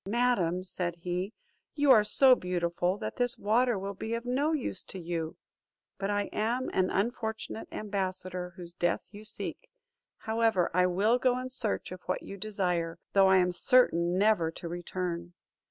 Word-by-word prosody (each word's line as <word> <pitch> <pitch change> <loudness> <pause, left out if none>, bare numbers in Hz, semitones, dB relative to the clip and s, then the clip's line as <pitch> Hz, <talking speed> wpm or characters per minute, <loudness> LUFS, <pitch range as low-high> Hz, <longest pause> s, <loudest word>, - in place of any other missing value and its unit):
"Madam," 200 -6 +1
said 180 -2 -3
he, 180 +3 -3 0.4
"you 290 -2 +4
are 220 -5 +7
so 255 +5 +6
beautiful, 180 -2 0
that - - -5
this 245 -1 +3
water 235 +2 +2
will 195 +1 -4
be 220 +4 -4
of 235 +1 -5
no 275 +5 +1
use 275 - -1
to - - -9
you; 165 -2 -4 0.6
but 195 0 -2
I 205 0 +1
am 240 +4 -1
an 185 -1 +2
unfortunate 220 +1 -2
ambassador, 185 -3 -3
whose 175 -2 -4
death 175 0 -1
you 205 0 -11
seek. - - -3 0.5
However, 220 -5 +1
I 180 +1 +4
will 205 +7 +2
go 250 -1 +2
in 255 0 -5
search 235 -7 -2
of 185 -1 -8
what - - -1
you 195 - -7
desire, 180 -5 -1 0.2
though 195 -1 +6
I 190 0 +6
am 180 -1 +3
certain 180 -5 +3
never 200 -5 +3
to 165 +1 -8
return." 175 0 -4
195 Hz, 170 wpm, -30 LUFS, 180-230 Hz, 0.6 s, are